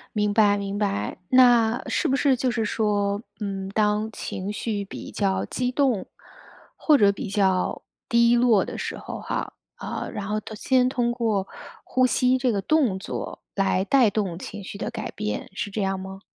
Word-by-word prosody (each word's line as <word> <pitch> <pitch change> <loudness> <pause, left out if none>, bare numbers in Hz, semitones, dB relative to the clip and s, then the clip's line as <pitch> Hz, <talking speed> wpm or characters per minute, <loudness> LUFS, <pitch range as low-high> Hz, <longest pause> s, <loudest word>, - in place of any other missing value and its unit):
明 210 -1 +1
白 205 -2 +4
明 200 0 -4
白， 105 - -1
那 245 -2 +5
是 335 - 0
不 270 - +1
是 275 -1 +3
就 250 0 0
是 225 -2 -1
说， 205 -1 0 0.2
嗯， 195 -2 -3
当 210 +1 +1
情 195 0 -5
绪 210 -2 -3
比 - - -8
较 195 -2 0
激 250 0 -2
动， 255 -7 +1 0.7
或 300 -3 +4
者 200 -1 +6
比 200 0 -5
较 190 -3 +1 0.3
低 235 0 +5
落 235 -5 +4
的 - - -5
时 - - -4
候 - - -7
哈， - - -4 0.2
呃， - - -5
然 200 0 -5
后 215 0 0
都 220 - -9
先 250 +3 +2
通 240 -2 0
过 220 -5 -1 0.3
呼 255 0 +2
吸 255 +1 +2
这 255 -2 +1
个 200 - 0
动 245 -5 +2
作 - - -6
来 195 -1 +1
带 250 -4 +4
动 190 -5 -2
情 205 +1 -7
绪 200 - -8
的 215 - -4
改 230 -2 -5
变， 210 +1 -4
是 205 -1 -3
这 210 - -3
样 195 -1 0
吗？ 190 +1 -8
210 Hz, 200 characters per minute, -24 LUFS, 200-240 Hz, 0.7 s, 者